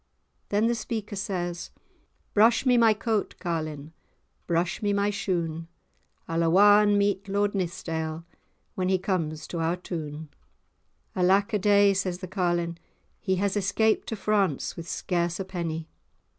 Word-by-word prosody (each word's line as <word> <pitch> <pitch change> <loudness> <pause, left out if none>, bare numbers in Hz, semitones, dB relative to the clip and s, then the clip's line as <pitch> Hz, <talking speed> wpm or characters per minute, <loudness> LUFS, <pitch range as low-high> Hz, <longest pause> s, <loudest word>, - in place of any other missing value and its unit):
Then 205 +2 +2
the 235 - +2
speaker 220 -2 -4
says:— 175 -3 -3 0.6
"Brush 225 +5 +4
me 250 -1 +5
my 230 -2 +6
coat, 215 0 -1
carlin', 155 -3 -4 0.5
Brush 170 +1 0
me 205 -1 +1
my 200 +1 +1
shoon; 170 -5 -2 0.6
I'll 165 0 0
awa 205 +5 +6
and 205 -1 +3
meet 200 0 0
Lord 205 +1 0
Nithsdale, 165 -3 -3 0.5
When 185 0 -1
he 190 - +3
comes 165 -5 -2
to 170 - -4
our 165 +2 0
town." 155 -4 -6 0.9
"Alack 190 +3 +3
a 210 - +2
day," 200 0 +5
says 185 -2 -1
the 185 - -7
carlin'. 175 -2 -1 0.4
"He 190 -3 0
has 195 +1 0
escaped 205 +2 +1
to 225 - -2
France, 200 -7 0
with 170 0 -8
scarce 175 0 -1
a 195 - -3
penny." 165 -3 -4
185 Hz, 145 wpm, -26 LUFS, 170-205 Hz, 0.9 s, my